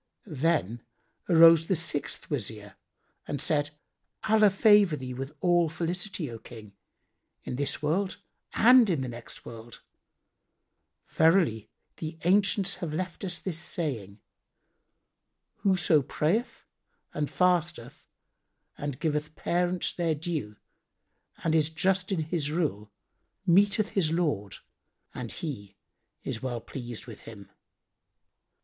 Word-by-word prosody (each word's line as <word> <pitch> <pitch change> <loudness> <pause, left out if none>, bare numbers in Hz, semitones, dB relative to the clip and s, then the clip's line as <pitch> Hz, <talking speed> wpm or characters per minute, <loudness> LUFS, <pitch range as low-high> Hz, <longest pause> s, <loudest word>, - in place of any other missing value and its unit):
Then 150 - -1 0.5
arose 165 -1 +7
the 190 - +2
sixth 160 -2 -3
Wazir 105 -6 -4 0.5
and 145 - -3
said, 145 -2 +1 0.5
"Allah 215 -1 +5
favour 200 -3 +5
thee 130 -2 -6
with 135 +3 -6
all 175 -2 +3
felicity, 175 +1 -3
O 115 - -8
King, 110 -3 -12 0.7
in - - -5
this 145 +2 -1
world 185 +6 0 0.4
and 245 -1 +6
in 160 -7 0
the 130 - -3
next 120 -1 -9
world! 115 0 -11 1.2
Verily, 160 - +2 0.3
the 160 0 -6
ancients 195 +1 +2
have 170 -5 -4
left 180 +4 -4
us 180 -2 -1
this 170 -4 -4
saying, 115 - -4 1.4
'Whoso 175 -6 +3
prayeth 170 - -1 0.5
and 150 -1 -2
fasteth 175 -8 0 0.7
and 145 -3 -4
giveth 155 -1 -2
parents 175 0 -1
their 165 -3 0
due 150 - -4 0.9
and 160 - +1
is 155 -1 +3
just 185 +4 0
in 180 -4 0
his 155 -2 -2
rule 145 - -2 0.5
meeteth 200 +3 +3
his 170 -6 +1
Lord 145 - -1 0.6
and 125 -3 -6
He 100 - -7 0.5
is 110 - -4
well 125 -2 -3
pleased 120 -1 -7
with 115 -4 -10
him.' 100 -3 -12
160 Hz, 115 wpm, -28 LUFS, 125-180 Hz, 1.4 s, arose